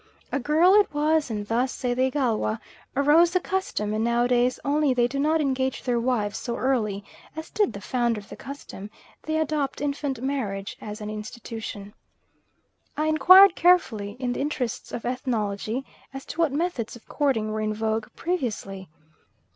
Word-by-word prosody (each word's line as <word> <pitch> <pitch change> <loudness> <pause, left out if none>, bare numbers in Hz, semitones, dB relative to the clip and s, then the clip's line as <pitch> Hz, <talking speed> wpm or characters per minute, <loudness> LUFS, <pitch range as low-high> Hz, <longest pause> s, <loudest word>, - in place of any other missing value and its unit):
A 280 - 0
girl 315 +8 +4
it 415 -1 +5
was, 305 0 +2
and 210 -2 -3
thus, 240 +4 0
say 250 -2 -2
the 255 +1 +2
Igalwa, 240 -5 0 0.4
arose 295 +5 +5
the 365 +1 +1
custom; 360 - -2
and 215 +1 0
nowadays, 245 +1 +2
although 285 -2 +2
they 240 -1 +3
do 275 +3 -4
not 310 +3 +2
engage 265 -2 -1
their 245 -2 +1
wives 230 -4 -1
so 235 - -4
early 220 -7 0 0.3
as 315 0 -7
did 415 -3 +1
the 200 - -8
founder 240 -2 0
of 205 - -14
the - - -8
custom, 265 -7 -9 0.3
they 315 0 -2
adopt 305 -3 -1
infant 280 -2 -2
marriage 225 -7 -3
as 210 +1 -7
an 210 0 -5
institution. 215 -1 -7 1.0
I 305 - +1
inquired 360 +5 +7
carefully, 235 - +2
in 250 -2 -1
the - - -3
interests 265 -5 -3
of 230 - -5
ethnology, 235 -1 -2 0.3
as 270 - -7
to - - -8
what 330 -4 +3
methods 285 -7 -2
of 235 - -16
courting 245 -8 0
were 215 0 -2
in 215 0 -1
vogue 220 0 -1
previously. 215 - -3
255 Hz, 170 wpm, -25 LUFS, 220-295 Hz, 1.0 s, inquired